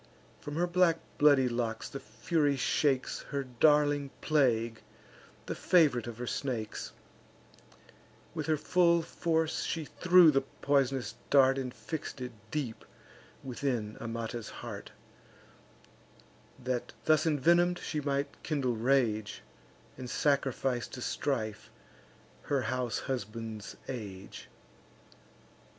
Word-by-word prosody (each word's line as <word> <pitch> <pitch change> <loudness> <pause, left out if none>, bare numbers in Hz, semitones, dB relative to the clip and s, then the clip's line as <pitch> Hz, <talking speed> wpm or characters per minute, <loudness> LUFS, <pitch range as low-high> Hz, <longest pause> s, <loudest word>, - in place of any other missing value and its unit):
From 145 - -7
her 175 +2 +2
black 175 -1 +3 0.2
bloody 145 -3 +6
locks 120 -2 -2
the 140 - -7
Fury 140 +7 0
shakes 135 0 +1
Her 140 -1 -2
darling 145 +2 +3
plague, 120 -7 +1 0.6
the - - -3
fav'rite 150 -10 +3
of 115 -2 -6
her 125 - -4
snakes; 120 -4 -3 1.4
With - - -4
her 155 -1 +2
full 170 +1 +3
force 160 -1 0
she 160 -2 -2
threw 180 0 +6
the 135 -1 +2
poisonous 135 -3 0 0.2
dart, 135 -1 +5
And 130 -2 -3
fix'd 155 +1 -6
it 125 0 -5 0.2
deep 130 -6 -3 0.6
within 125 -5 -2
Amata's 115 0 -4
heart, - - -8 1.7
That, 125 -1 -3
thus 155 0 +4
envenom'd, 170 +4 +3
she 155 -3 -3
might 140 0 -2
kindle 135 -6 -1
rage, 115 -3 +1 0.6
And 125 -1 -6
sacrifice 135 -3 0
to 125 - -8
strife 110 -7 -2 0.7
her 140 -2 0
house 125 -1 -1
and - - -10
husband's 110 -4 -5
age. 100 -7 -7
135 Hz, 110 wpm, -31 LUFS, 120-150 Hz, 1.7 s, bloody